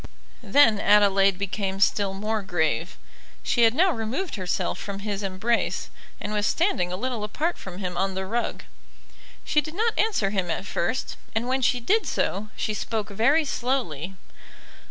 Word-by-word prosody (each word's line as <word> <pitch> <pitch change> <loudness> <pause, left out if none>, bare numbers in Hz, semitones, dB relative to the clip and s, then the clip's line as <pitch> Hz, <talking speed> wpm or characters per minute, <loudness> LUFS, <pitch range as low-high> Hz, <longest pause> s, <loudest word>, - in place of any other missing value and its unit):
Then 230 -8 +5
Adelaide 200 -2 +4
became 195 0 -2
still 200 -1 +2
more 215 +2 -1
grave. 170 -2 -1 0.5
She 240 - +1
had 225 +1 +3
now 365 +5 +4
removed 255 - -3
herself 185 -4 -2
from 200 -1 -6
his 205 -1 -3
embrace, 200 +5 -1 0.3
and 210 - -4
was 210 0 +1
standing 210 - +1
a 180 - -3
little 245 0 -3
apart 310 +11 -1
from 185 -2 -9
him 180 -2 -4
on 190 +1 0
the 190 0 -2
rug. 235 +5 -2 0.8
She 300 - +3
did 310 +3 -8
not 450 +3 +1
answer 390 - +2
him 190 -4 -1
at 165 +4 -2
first; 195 +6 -2 0.2
and 230 +2 0
when 260 +1 0
she 250 0 +2
did 420 - +1
so, 210 +2 -1
she 215 - -2
spoke 215 0 -3
very 270 +10 +3
slowly. 225 - -2
210 Hz, 165 wpm, -25 LUFS, 195-255 Hz, 0.8 s, Then